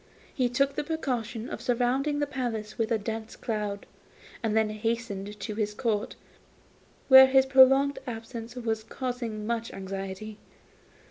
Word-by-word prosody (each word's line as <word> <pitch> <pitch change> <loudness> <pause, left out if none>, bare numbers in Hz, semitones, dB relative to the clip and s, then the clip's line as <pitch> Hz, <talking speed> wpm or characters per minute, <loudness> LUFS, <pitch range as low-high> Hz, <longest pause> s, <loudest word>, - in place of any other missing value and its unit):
He 250 -2 +1
took 275 +3 +1
the 300 - -2
precaution 250 -7 -3
of - - -6
surrounding 255 +4 +1
the 290 - +1
palace 235 -6 -4
with 225 0 -1
a 230 - +3
dense 220 +1 -5
cloud, 210 -3 -3 0.6
and 220 -1 0
then 220 -1 +2
hastened 215 -2 -3
to 210 - -4
his 210 -1 -2
Court, 215 -3 -1 0.9
where 265 -1 +10
his 265 0 +5
prolonged 270 +1 +5
absence 230 0 -7
was 225 -3 -2
causing 235 -3 -4
much 230 0 -2
anxiety. 195 +2 -6
230 Hz, 140 wpm, -28 LUFS, 215-260 Hz, 0.9 s, where